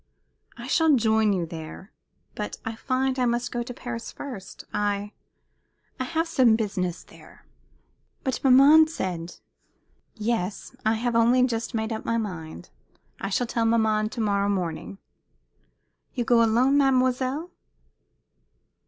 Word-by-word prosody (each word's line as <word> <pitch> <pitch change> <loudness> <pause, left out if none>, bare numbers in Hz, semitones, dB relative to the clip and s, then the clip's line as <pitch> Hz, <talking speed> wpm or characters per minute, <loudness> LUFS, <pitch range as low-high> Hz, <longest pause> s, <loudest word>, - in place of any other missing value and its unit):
"I - - -8
shall 320 -3 +3
join 220 -2 +3
you 180 -4 0
there. 165 +4 -9 0.4
But 210 - -5
I 225 - -3
find 260 +2 -1
I 250 - +2
must 240 +1 -1
go 240 - -2
to 240 - -6
Paris 240 -1 -6
first. 215 -9 -9
I 205 0 -1 0.9
I 255 - -1
have 325 +4 -1
some 255 -8 +4
business 185 -5 -2
there." - - -18 0.8
"But 260 -4 -2
maman 280 +4 +7
said 175 - -4 0.4
" - - -43
"Yes, 215 -4 -3
I 220 - +2
have 235 +1 -1
only 240 +2 +4
just 230 -1 -3
made 220 0 -1
up 220 - -5
my 230 - 0
mind. 160 - -6 0.5
I 195 - -3
shall 245 +5 0
tell 230 -1 -1
maman 220 -2 +2
to 230 - -5
morrow 200 -1 +1
morning," 185 -1 -3 1.2
"You 245 - 0
go 235 0 +4
alone, 245 +5 +3
mademoiselle?" 260 +4 +1
230 Hz, 140 wpm, -25 LUFS, 205-255 Hz, 1.2 s, maman